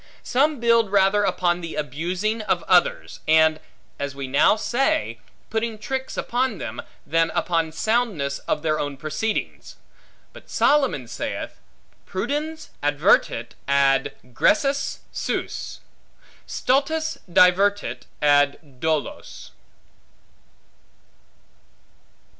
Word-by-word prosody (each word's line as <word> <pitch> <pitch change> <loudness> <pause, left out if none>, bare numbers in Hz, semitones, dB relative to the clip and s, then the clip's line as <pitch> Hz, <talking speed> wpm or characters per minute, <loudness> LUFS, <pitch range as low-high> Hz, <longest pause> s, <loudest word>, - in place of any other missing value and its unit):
Some 285 +2 +1
build 230 -3 +3
rather 200 +1 +3
upon 180 -2 +1
the 165 -1 -6
abusing 175 - -2
of 180 -5 -1
others, 180 -1 +2
and 160 0 +4 0.4
(as 140 -1 -4
we 140 -1 -5
now 145 +9 +4
say) 215 - 0 0.3
putting 225 0 -2
tricks 265 +5 -4
upon 255 +2 -1
them, - - -6 0.2
than 165 0 +2
upon 165 -2 0
soundness 185 - 0
of 150 - -1
their 155 -1 +1
own 145 -1 -3
proceedings. 155 +10 -3 0.6
But - - -15
Solomon 270 - +2
saith, 120 +1 -5 0.5
Prudens 295 +11 -3
advertit 145 0 +2 0.2
ad 140 -1 +2 0.2
gressus 275 - +1
suos; - - -4 0.7
stultus 315 +5 0
divertit 195 +4 +3 0.2
ad 145 -1 +2
dolos. 160 0 -3
180 Hz, 95 wpm, -23 LUFS, 150-230 Hz, 0.7 s, and